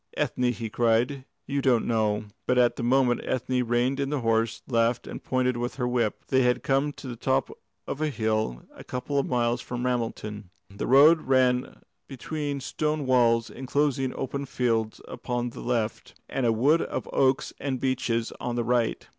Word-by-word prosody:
"Ethne," 125 -1 +1
he 115 -2 -5
cried, 120 +4 +1 0.2
"you 140 0 -1
don't 125 -4 +3
know 110 -2 0
" - - -49
But 125 - +2
at 120 -1 +4
that - - -5
moment 125 0 +2
Ethne 130 0 -1
reined 120 +3 +1
in 140 0 -1
her 150 - 0
horse, 115 0 0
laughed, 115 -1 +1
and - - -8
pointed 125 -1 0
with 120 +1 -3
her 125 -2 -1
whip. 120 -3 -1
They 130 -1 +4
had 125 0 +2
come 135 +2 +1
to 135 - -10
the 120 - -5
top - - 0 0.3
of 145 - -5
a 155 - +1
hill 110 - -1
a - - -12
couple 130 +3 -2
of 140 - -1
miles 120 -1 +1
from 125 0 -4
Ramelton. 110 -5 -3 0.3
The - - -3
road 150 +5 +7
ran 130 -1 +2 0.2
between 145 +1 -4
stone 150 +2 -2
walls 115 -3 +3
enclosing 135 0 0
open 140 +1 -4
fields 115 -4 -1
upon 120 -1 -3
the - - -9
left, 115 -3 -3
and 130 -3 -1
a - - +4
wood 140 +9 +3
of - - -4
oaks 135 0 +2
and 130 -3 -2
beeches 120 -3 -1
on 120 -1 -3
the 120 - 0
right. 120 0 0
125 Hz, 185 wpm, -26 LUFS, 115-135 Hz, 0.3 s, road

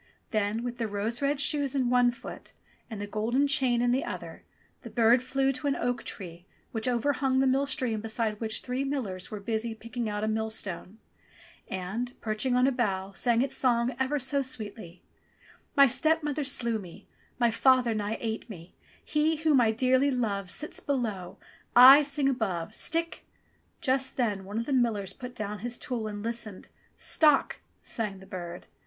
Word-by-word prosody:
Then 215 +1 0
with 245 0 -5
the 230 - 0
rose 215 +4 -2
red 280 0 +1
shoes 285 -1 0
in 255 -3 +1
one 245 -1 +5
foot 240 - -9 0.4
and 220 -3 -6
the 205 - -3
golden 225 +7 +1
chain 260 -4 +2
in 245 - +3
the 260 +2 +1
other, - - -7 0.4
the - - -9
bird 235 +1 +4
flew 270 +1 +1
to 275 +2 -4
an 275 - +2
oak 245 -1 -1
tree 175 -3 -9 0.2
which 225 +1 -2
overhung 260 +2 +1
the 265 - +4
mill 270 +2 +2
stream 245 -6 -1
beside 220 -1 -2
which 220 -1 -1
three 255 +2 -2
millers 235 -10 -3
were 210 - -5
busy 225 +2 -2
picking 230 0 -4
out 210 0 -3
a - - +1
millstone, 220 -3 -3 0.7
and, 200 +7 -4
perching 220 +4 -1
on 250 0 +4
a 270 - +3
bough, 195 -6 -1
sang 235 +3 +2
its 270 - -2
song 240 -1 +2
ever 265 +3 +1
so 280 +1 0
sweetly: 210 -8 -6 0.7
"My 280 - +9
stepmother 300 +1 +1
slew 235 -4 0
me, 190 +1 -12 0.3
My 240 -2 +3
father 250 0 +4
nigh 215 +1 -2
ate 225 +1 -4
me, 175 -4 -10 0.3
He 310 +1 +2
whom 305 -4 +3
I 225 - +4
dearly 255 +4 +3
love 205 -7 -1
Sits 305 - -5
below, 220 -10 -3 0.4
I 260 +4 +11
sing 285 -1 +1
above, 200 -11 -1
Stick! 330 +1 -1 0.2
— - - -38
" - - -41
Just 265 0 0
then 210 -6 0
one 205 +3 -5
of 230 - -1
the 280 - -2
millers 215 -6 +1
put 250 +1 -9
down 210 -1 -4
his 240 +3 -3
tool 235 -4 -3
and 205 -1 -6
listened. 230 -4 -4 0.3
"Stock 300 -3 +3
!" - - -41
sang 210 -4 -3
the 190 - -13
bird. 175 -2 -7
235 Hz, 185 wpm, -28 LUFS, 215-265 Hz, 0.7 s, I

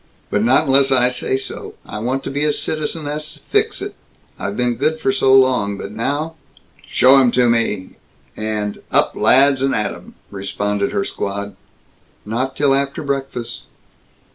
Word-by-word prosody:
"But 105 - +1
not 130 +6 +4
unless 135 0 +4
I 125 -1 +5
say 125 +1 -1
so. - - -6
I - - -6
want 130 +4 -2
to - - -5
be 145 +2 -1
a 150 - +3
Citizeness 150 0 -3
Fixit. - - 0 0.5
I've 100 +1 -4
been 125 -1 +1
good 155 +7 -1
for 135 - +1
so 130 0 +2
long. 125 -7 +3
But 100 - -7
now 145 +9 -2 0.3
" - - -28
"Show 135 +2 +6
him 130 -2 +4
to 125 -1 +3
me!" 115 -5 -1 0.4
and 105 -1 -3
"Up, - - +3
lads, 135 0 +5
and 135 0 +1
atum!" 105 - -4 0.2
responded 100 +1 -2
her 100 - -1
squad. 100 0 -4 0.7
"Not 125 +5 -2
till 140 -2 +3
after 140 +2 -1
breakfast." 135 -4 -4
130 Hz, 160 wpm, -19 LUFS, 105-140 Hz, 0.7 s, Show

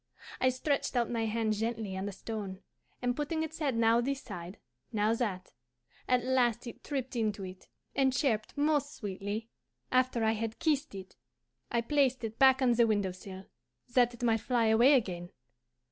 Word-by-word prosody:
I 255 - +4
stretched 275 +2 -1
out 240 -1 +1
my 230 -1 0
hand 220 0 0
gently 220 -2 -2
on 190 +1 -3
the - - -3
stone, 195 -1 -6 0.4
and 245 0 +1
putting 310 +3 -1
its 320 +1 -6
head 280 -6 0
now 230 +1 +4
this 275 +2 -1
side, 175 +2 -8 0.3
now 215 0 +2
that, 205 -6 -3 0.5
at 250 -1 +3
last 255 -3 +2
it 235 - -9
tripped 265 -3 -3
into 215 -4 -1
it, 185 0 -9 0.3
and 270 -1 +3
chirped 250 -5 0
most 290 0 +1
sweetly. 205 +1 -4 0.4
After 255 -2 +2
I 220 - +4
had 225 +1 -3
kissed 295 -7 0
it 190 -1 -10 0.5
I 235 - +1
placed 260 0 +1
it 225 0 -5
back 265 0 +6
on 250 - +4
the 235 0 +4
window 205 -3 +1
sill, 190 +1 -10 0.5
that 245 -1 +4
it 240 - -9
might 225 -1 +3
fly 240 0 +1
away 240 +6 +6
again. 175 -8 -1
230 Hz, 175 wpm, -31 LUFS, 210-260 Hz, 0.5 s, back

